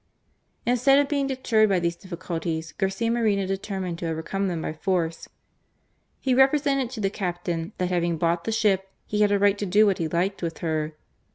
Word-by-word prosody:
Instead 250 +3 +4
of 285 0 +3
being 280 -1 0
deterred 235 -5 +2
by 190 -2 +3
these 170 0 -1
difficulties, 165 -3 -4
Garcia 195 +4 -1
Moreno 215 -4 +1
determined 190 -2 -3
to 170 - -3
overcome 165 +5 -2
them 170 -3 -3
by - - -3
force. 165 0 -2 0.9
He 260 - +1
represented 275 0 +3
to 250 -3 -7
the 195 -2 0
captain 175 -1 -3
that 180 -1 -1
having 175 -2 0
bought 170 +1 0
the - - -1
ship 200 -4 +1 0.2
he 210 0 -1
had 205 -1 +4
a 205 - +4
right 200 0 +3
to 205 - -1
do 205 +4 +5
what 195 -3 +1
he 165 - 0
liked, 180 +5 -1
with 165 -2 -3
her. 155 -2 -2
195 Hz, 190 wpm, -25 LUFS, 170-220 Hz, 0.9 s, do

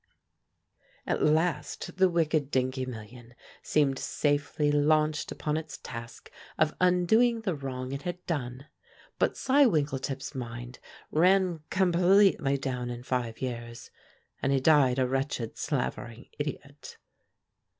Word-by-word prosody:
At - - -1
last 155 +1 0
the 190 0 +5
wicked 155 -4 +1
Dingee 130 -1 -1
million 120 0 -10 0.3
seemed 140 -3 +1
safely 145 0 0
launched 150 +1 +2
upon 150 0 -2
its 155 -3 -6
task 115 -1 -9 0.3
of 155 -1 +2
undoing 220 +7 +3
the 200 -5 -1
wrong 130 -3 -5
it 140 +1 -4
had 175 +3 -6
done; 135 -4 -4 0.5
but - - +1
Cy 275 +1 +4
Winkletip's 140 - -2
mind 120 -1 -7 0.3
ran 180 +1 +3
completely 180 -5 +3
down 125 -2 -3
in 120 0 -6
five 125 -3 -3
years 120 -2 -6 0.5
and 135 - +1
he 135 - +3
died 135 -3 +4
a 130 - +2
wretched 135 -3 -2
slavering, 125 -4 -4
idiot. 145 -1 -6
145 Hz, 120 wpm, -28 LUFS, 130-160 Hz, 0.5 s, the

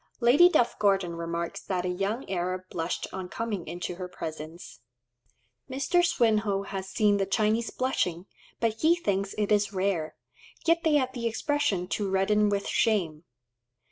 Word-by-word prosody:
Lady 260 +9 +6
Duff 245 -9 +2
Gordon 195 -4 +2
remarks 170 0 -4
that 185 -2 -2
a - - 0
young 195 +7 -2
Arab 185 0 -2
blushed 165 0 -2
on 185 -1 -5
coming 210 -5 -4
into 175 +1 -5
her 185 -1 -5
presence. 160 -1 -8 0.9
Mr. 275 +7 +1
Swinhoe 220 - +2
has 190 -1 -5
seen 205 +1 +3
the 195 -1 0
Chinese 220 +3 +1
blushing, 180 -9 -1 0.3
but 225 -1 -1
he 325 +2 +5
thinks 200 - -2
it 210 0 0
is 205 -1 +2
rare; 185 -5 -1 0.5
yet 335 0 +3
they 315 -2 +3
have 260 -3 +1
the 235 -2 -2
expression 235 - 0
"to 200 -1 -1
redden 205 +2 +2
with 200 -1 -1
shame." 175 -8 0
200 Hz, 155 wpm, -28 LUFS, 180-230 Hz, 0.9 s, Lady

